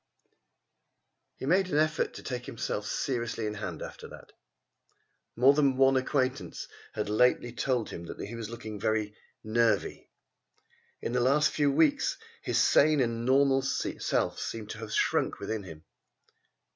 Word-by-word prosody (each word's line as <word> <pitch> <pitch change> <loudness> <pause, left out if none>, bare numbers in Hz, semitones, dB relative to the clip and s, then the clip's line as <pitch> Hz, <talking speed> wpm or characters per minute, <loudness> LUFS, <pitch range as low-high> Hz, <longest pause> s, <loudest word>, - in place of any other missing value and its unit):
He - - -6
made 185 +5 +3
an 150 - 0
effort 155 +1 +1
to - - -9
take 125 -1 -5
himself 105 -2 -3
seriously 120 -3 -2
in 105 - -2
hand 95 -6 -5
after - - -9
that. - - -13 1.0
More 130 +4 +6
than 140 -3 +2
one 135 0 +5
acquaintance 130 0 -1 0.3
had 105 - -3
lately 120 +2 +2
told 125 -2 -1
him 85 - -7
that - - -9
he 105 - -6
was 115 -2 -6
looking 110 -3 -7 0.6
"nervy." 115 +1 0 0.9
In - - -2
the 125 - +1
last 140 +5 +3
few 145 -2 +2
weeks 295 - +2 0.2
his - - -1
sane 155 0 +4
and 115 -2 0
normal 135 0 +4
self 135 +1 -1
seemed 110 -2 -5
to 110 - -7
have 110 -1 -7
shrunk - - +1
within 110 -1 -3
him. 80 -5 -11
125 Hz, 145 wpm, -29 LUFS, 110-140 Hz, 1.0 s, More